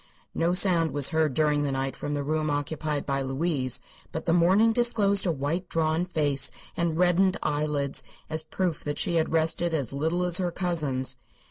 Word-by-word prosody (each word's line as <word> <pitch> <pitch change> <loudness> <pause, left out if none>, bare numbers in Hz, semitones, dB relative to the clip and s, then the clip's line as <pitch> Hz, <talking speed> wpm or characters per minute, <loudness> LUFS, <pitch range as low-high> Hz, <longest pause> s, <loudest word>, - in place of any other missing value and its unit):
No 170 +2 0
sound 175 -5 +4
was 145 -2 +3
heard 155 -4 0
during 150 -1 +2
the 145 -1 -1
night 135 0 -2
from 145 - -4
the 145 - -2
room 155 +1 -1
occupied 145 0 -2
by 135 -1 -1
Louise, 135 -1 0 0.3
but 160 - -5
the 165 - +2
morning 190 +7 +4
disclosed 210 -5 +3
a - - +2
white, 160 +5 -3
drawn 160 +1 0
face 145 -6 +1 0.3
and 170 -2 -1
reddened 180 +2 +3
eyelids 145 -2 -1 0.3
as 160 0 -1
proof 165 +1 -3
that 145 0 -3
she 170 - +1
had 160 - 0
rested 165 +1 +1
as 135 -5 -2
little 160 +5 -1
as 180 +1 +3
her 180 -1 0
cousins. 155 -8 -1
160 Hz, 185 wpm, -26 LUFS, 145-175 Hz, 0.3 s, sound